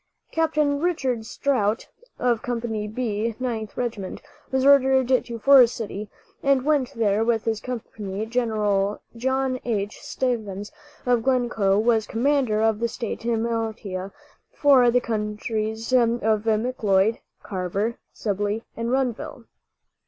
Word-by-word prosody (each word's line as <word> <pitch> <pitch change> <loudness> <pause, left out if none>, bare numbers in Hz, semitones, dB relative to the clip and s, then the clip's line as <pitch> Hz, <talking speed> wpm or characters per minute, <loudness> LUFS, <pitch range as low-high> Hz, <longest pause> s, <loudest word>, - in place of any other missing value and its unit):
Capt. 320 -1 0
Richard 285 -6 +1
Strout, 230 -6 0 0.3
of 240 -3 +1
Company 230 -3 -3
"B," 220 -1 -2
Ninth 225 -4 -4
Regiment, 225 -6 -3 0.3
was 265 0 +1
ordered 265 -2 +5
to 245 -2 +1
Forest 255 0 +6
City, 210 -2 -5 0.3
and 275 -1 +2
went 280 -3 +1
there 215 -1 +2
with 225 -1 +1
his 220 -1 -1
company. 215 -4 -5
Gen. 210 -4 0 0.2
John 260 +1 0
H. 210 -3 -2
Stevens 210 -6 -3 0.3
of 245 -2 +3
Glencoe 235 -6 +2
was 220 0 +2
commander 240 -3 +1
of 220 -1 +2
the 235 - +1
state 230 -1 -5
militia 225 -4 -2 0.4
for 265 -4 +5
the 245 +1 +3
counties 220 +1 -3
of 240 -2 +5
McLeod, 220 -2 +1 0.2
Carver, 195 +4 -2
Sibley 205 +1 -2
and 230 0 -3
Renville. 260 +1 -2
230 Hz, 120 wpm, -24 LUFS, 215-255 Hz, 0.4 s, Forest